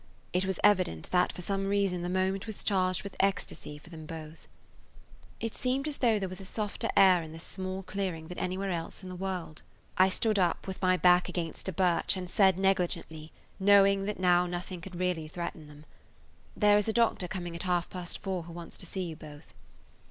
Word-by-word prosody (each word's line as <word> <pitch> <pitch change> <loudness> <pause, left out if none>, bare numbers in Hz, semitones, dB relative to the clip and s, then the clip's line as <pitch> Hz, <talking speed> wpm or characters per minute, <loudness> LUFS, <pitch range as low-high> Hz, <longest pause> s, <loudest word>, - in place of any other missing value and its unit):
It 180 +1 +1
was 190 -1 -1
evident 185 - +2
that 180 0 +3
for 180 - -6
some 195 +1 -1
reason 195 -3 +1
the 175 - -3
moment 190 +2 0
was 220 - -6
charged 185 -3 +1
with 200 - -8
ecstasy 195 -6 -1
for 160 +3 -16
them 160 -2 -9
both. 160 0 -9 0.9
It 225 -1 -3
seemed 265 +3 0
as 295 - -1
though 230 -4 +3
there 195 -2 -2
was 185 +1 -6
a - - -7
softer 210 +2 -3
[Page - - -2
145] 190 -2 +8
air - - -5
in 155 - -9
this 165 +1 -8
small 190 0 -5
clearing 185 -4 -3
than 180 - -7
anywhere 185 +2 -2
else 170 +2 -4
in 185 - -7
the 185 - -6
world. 180 -4 -4 0.4
I 190 +1 +7
stood 215 +2 +1
up, 175 -2 +1
with 190 -1 -6
my 185 -1 +3
back 180 0 +5
against 170 +1 -3
a - - -1
birch 180 +1 +1
and 180 -1 -4
said 190 0 +4
negligently, 180 -5 -1 0.3
knowing 200 0 +5
now - - -4 0.4
that - - -5
nothing 175 0 -5
could 180 +1 -9
really 175 -3 -1
threaten 165 -1 -6
them: 150 +1 -14 0.7
"There 210 -1 +5
is 210 - -1
a 220 - +1
doctor 230 -6 +2
coming 175 -2 -5
at 170 - -5
half 180 -2 0
past 180 -2 -4
four 190 -3 -3
who 170 - -9
wants 170 -1 -8
to 180 - -8
see 190 +2 -3
you 165 -3 -5
both." 150 -2 -12
185 Hz, 215 wpm, -30 LUFS, 170-195 Hz, 0.9 s, 145